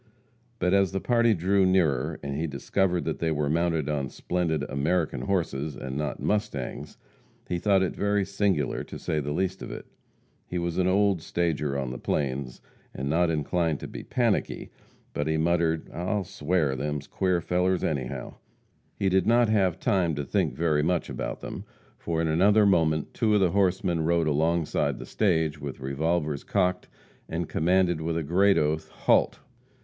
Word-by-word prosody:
But 90 +1 +1
as 100 -1 +3
the 95 - 0
party 115 0 +3
drew 95 +3 +2
nearer, 80 -5 +2
and 70 -1 -3
he 80 +3 -1
discovered 90 +3 0
that - - -2
they 85 - 0
were 75 -2 0
mounted 80 -2 +1
on 70 -3 -1
splendid 80 -2 -1
"American 75 -1 0
horses," 75 -3 -1
and 65 +1 -6
not 75 -2 -3
"mustangs," 75 -7 -3 0.5
he 90 - -2
thought 95 0 +3
it 95 - -2
very 100 -1 +1
singular, 100 -7 0
to - - -9
say 75 - -2
the 75 0 -3
least 95 +4 -1
of - - -6
it. - - -7 0.6
He 90 - -4
was 85 0 -2
an 90 - +2
old 100 -2 +2
stager 80 -4 -1
on 65 -2 -3
the 65 - -6
plains, 65 -2 -2 0.3
and 70 +2 -2
not 85 +1 +3
inclined 80 0 0
to - - -5
be - - -7
"panicky," 120 -4 -1 0.4
but 75 - -2
he 80 0 +1
muttered, 80 0 +1
"I'll 95 +4 -1
sware, 85 -6 0
them's 75 +2 -3
queer 90 -2 0
fellers, 90 +2 0
anyhow." 65 -6 -3 0.6
He 100 - 0
did 95 0 +2
not 120 0 +4
have 95 -5 +2
time 95 -8 +1
to 70 -1 -3
think - - 0
very 80 -3 +1
much 85 +2 0
about - - -4
them, - - -6 0.4
for 85 -1 -1
in - - 0
another 100 +7 +4
moment 80 -5 +2
two 110 -2 +2
of - - +4
the 95 -3 +3
horsemen 90 -3 +1
rode 85 0 +2
alongside 80 +2 +1
the - - -8
stage, 80 -7 0
with 70 -1 -6
revolvers 75 +2 -1
cocked, 90 0 0 0.4
and 85 0 -2
commanded, 90 0 +2
with 80 +1 -1
a 85 - -1
great 95 +6 +3
oath, 75 +1 0
"Halt!" - - +2
85 Hz, 175 wpm, -27 LUFS, 75-95 Hz, 0.6 s, not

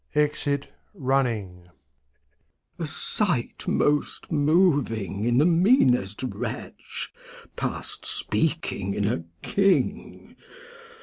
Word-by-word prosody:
\E%it 145 -1 +1 0.3
Running. 115 -10 -1 1.1
Glost. - - -38
A 165 - -2
Sight 155 - -1
most 145 +4 0
moving 145 - +2
in 120 0 +2
the 145 - +5
meanest 165 - +3
Wretch, 130 - -5 0.4
Past - - -4
speaking 160 - -1
in 105 -1 0
a 95 -7 -1 0.2
King. 195 -1 0
140 Hz, 85 wpm, -25 LUFS, 110-165 Hz, 1.1 s, the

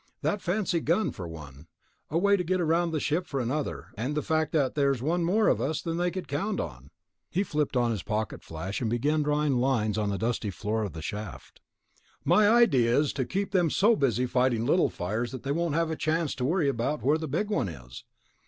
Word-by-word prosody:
That 205 - 0
fancy 180 -1 0
gun, 170 +7 +1
for 90 - -7
one. 75 -2 -10 0.4
A 160 - 0
way 200 +3 +4
to 185 - -1
get 185 +2 0
around 170 +1 +2
the 160 -2 -1
ship, 160 +5 -1
for 140 - -2
another... 130 +5 -3
and 125 +7 -3
the 150 - 0
fact 160 -2 0
that 140 -5 +1
there's 140 -3 +1
one 165 +7 0
more 205 +6 +2
of - - +2
us 155 +2 -1
than 165 0 -3
they 175 +1 +1
count 185 +2 -3
on." 65 +2 -6 0.4
He 190 +3 0
flipped 150 -7 -1
on 120 -1 +2
his 105 -5 -2
pocket 110 +2 -3
flash, 80 +7 -5
began 125 +7 +1
drawing 150 -2 +1
lines 115 -4 +1
on 105 -1 0
the 100 - -1
dusty 115 -1 -1
floor 110 +3 -2
of 100 -7 -3
the 80 -1 -7
shaft. 105 +4 -7 0.6
"My 195 +7 +5
idea 135 - +4
is 145 0 +2
to 130 - -1
keep 195 +7 -2
them 180 -4 +3
so 215 +9 +4
busy 125 - +1
fighting 125 -2 +1
little 175 +7 +3
fires 110 +7 -3
that 130 - -7
they 140 - -2
won't 165 0 0
have 165 -1 +1
a - - -1
chance 160 0 0
to 125 - -3
worry 165 +1 +1
about 135 +3 -1
where 150 +4 +3
the 160 - -4
big 185 +10 -1
one 125 - 0
is." 60 -6 -10
145 Hz, 220 wpm, -28 LUFS, 115-170 Hz, 0.6 s, My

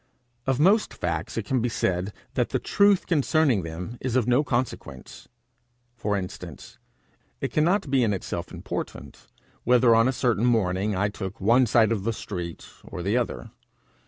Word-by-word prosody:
Of 135 0 +1
most 200 +7 +3
facts 85 +1 -3
it 115 +1 -4
may 130 - +3
be 120 +1 0
said 95 -3 -1 0.2
that - - 0
the - - 0
truth 200 -2 +3
concerning 150 - +2
them 90 +8 -7
is 130 -2 -2
of 125 -3 +2
no 125 +4 +3
consequence. 120 - -4 0.7
For 105 -3 -1
instance, 90 -2 -8 0.6
it - - -3
cannot 175 +4 +2
be 135 -2 +3
in 110 - +2
itself 90 -3 -4
important - - -7 0.4
whether 125 -1 +5
on 115 +2 +5
a - - +2
certain 120 -3 +1
morning 100 -3 +1
I 100 +2 +1
took 100 0 -7
one 120 +6 +4
side 115 0 +4
of 105 -4 -1
the 115 +2 0
street 90 -6 -6 0.2
or 90 - -7
the 100 +5 0
other. 120 - -2
115 Hz, 165 wpm, -25 LUFS, 95-130 Hz, 0.7 s, whether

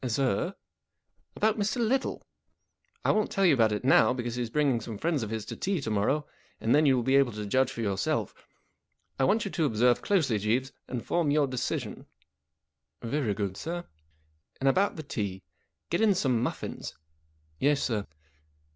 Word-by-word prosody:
" 130 - -3
Sir? 135 - 0 0.3
" - - -56
" - - -44
About 220 0 +1
Mr. 205 +3 0
Little. 245 +3 0 0.8
I - - +5
won't 215 0 +1
tell 195 - +1
you 170 - +6
about 115 -5 +3
it 105 +4 -2
now, 125 -3 +5
because 120 -2 -3
he's 120 -1 -3
bringing 135 -3 +1
some 110 -1 -6
friends 160 +2 0
of 110 - -4
his 110 -1 -4
to - - -6
tea 190 -2 -1
to 115 -6 -4
morrow, 125 +9 +1 0.3
and 115 - +1
then 150 +1 +5
you 135 - +5
will 125 - 0
be 130 +3 +4
able 135 -4 +3
to 105 0 -5
judge 130 +5 +2
for 120 - -5
yourself. 100 -3 -1 0.9
I 135 - +4
want 210 +10 +2
you 200 - -4
to 165 - 0
observe 120 -1 +3
closely, 155 - +1
Jeeves, 120 +6 0 0.2
and 125 -3 -5
form 170 -4 +1
your 145 0 +3
decision." 130 -2 -4 0.5
" 75 -1 -56
Very 115 -4 -1
good, 100 -2 -2
sir." 175 +2 -4 0.4
" 75 0 -39
And 135 - 0
about 190 +9 +3
the 155 - -6
tea. 100 - -4 0.5
Get 170 - +1
in 210 -3 +4
some 125 -8 +1
muffins." 125 - -4 0.3
" - - -41 0.3
Yes, 145 0 +2
sir." 110 -5 -1
130 Hz, 200 wpm, -28 LUFS, 110-155 Hz, 0.9 s, you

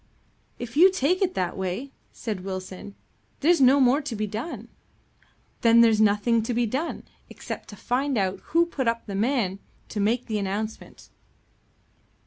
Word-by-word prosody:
"If 240 +1 -7
you 365 +5 +7
take 365 +2 +1
it 370 -2 +1
that 180 -2 -1
way," 190 +9 -4 0.2
said 210 -5 -5
Wilson, 185 +1 -7 0.5
"there's 330 +1 +4
no 265 +2 +6
more 265 +3 +4
to 275 -5 -5
be 215 0 -1
done." 225 - -6 0.9
"There's 230 -2 +5
nothing 215 +2 +3
to 230 +2 -3
be 240 0 +2
done, 270 +9 -3 0.3
except - - -8
to 205 - -9
find 255 +5 -1
out 190 -2 0
who 335 +1 +3
put 275 -7 -3
up 230 0 0
the 200 - -6
man 205 -3 0 0.3
to 210 - -4
make 225 +5 +1
the 215 -3 -2
announcement." 205 +3 -5
230 Hz, 155 wpm, -25 LUFS, 205-270 Hz, 0.9 s, you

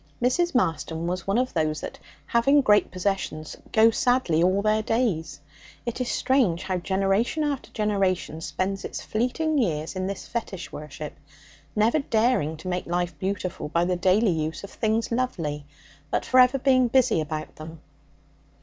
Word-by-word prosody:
Mrs. 265 +7 +1
Marston 160 - 0
was 180 +1 -3
one 195 +3 +2
of 255 +1 0
those 155 -2 0
that, - - -7 0.3
having 275 - +4
great 210 -5 +4
possessions, 185 -5 -3 0.2
go 225 +1 +6
sadly 245 -10 +2
all 185 +3 +2
their 215 0 +2
days. 210 - -1 0.5
It 235 +1 -3
is 250 - -1
strange 235 -11 +1
how 185 -1 -1
generation 195 - 0
after 285 -3 -2
generation 195 -6 -1
spends 195 +3 -3
its - - -5
fleeting 285 +7 0
years 160 - -1
in 185 0 -2
this 200 -1 -5
fetish 215 -6 -5
worship, 150 0 -7 0.6
never 220 +8 +3
daring 225 - +1
to 160 - -9
make 180 0 -2
life 175 -1 -1
beautiful 185 -5 -3
by 170 +2 +1
the 180 0 0
daily 190 +4 +3
use 160 +1 -3
of 200 - -8
things 225 +1 -1
lovely, 165 - -2 0.4
but - - -1
for 255 - +4
ever 255 +2 +6
being 255 -1 +3
busy 245 -7 +3
about 155 0 -5
them. 160 +1 -9
195 Hz, 160 wpm, -25 LUFS, 165-240 Hz, 0.6 s, go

